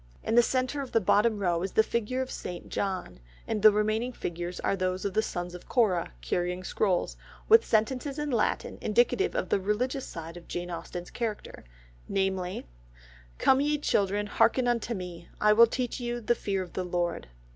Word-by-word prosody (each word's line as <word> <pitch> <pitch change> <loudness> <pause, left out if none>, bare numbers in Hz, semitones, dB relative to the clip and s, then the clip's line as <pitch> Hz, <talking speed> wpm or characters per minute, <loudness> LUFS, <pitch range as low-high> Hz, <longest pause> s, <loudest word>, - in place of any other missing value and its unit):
In 225 - -1
the 240 - +8
centre 255 +3 0
of 265 - -7
the 225 - +5
bottom 210 +2 +3
row 175 -4 0
is 190 +1 -3
the 220 - +5
figure 235 +3 -1
of 260 - -9
St. 175 -1 -6
John, 190 - -3 0.3
and 215 -2 -1
the 215 +1 +9
remaining 215 +4 0
figures 175 -3 -5
are - - +1
those 185 0 -2
of 200 - -1
the 220 - +3
sons 175 -4 -4
of 180 - -11
Korah 210 -9 +2
carrying 180 - -2
scrolls, 190 -2 0 0.3
with 450 +1 +7
sentences 255 +6 0
in 295 -1 -2
Latin, 230 -4 0
indicative 240 - +2
of - - -1
the - - +2
religious 250 +7 -1
side 165 +1 -8
of 175 - -13
Jane 175 0 -4
Austen's 175 +1 -6
character, 225 -3 -4 0.5
namely, 190 -2 -1 0.7
"Come 265 +1 +4
ye 295 +1 +1
children, 205 -7 +1
hearken 245 +4 +2
unto 235 -1 0
me; 175 -2 -8
I 210 0 +5
will 230 +2 +7
teach 250 +1 -3
you 240 0 -3
the 240 +1 +2
fear 195 -4 -2
of 180 - -12
the 185 - -2
Lord." 175 -1 -2
210 Hz, 190 wpm, -28 LUFS, 180-240 Hz, 0.7 s, the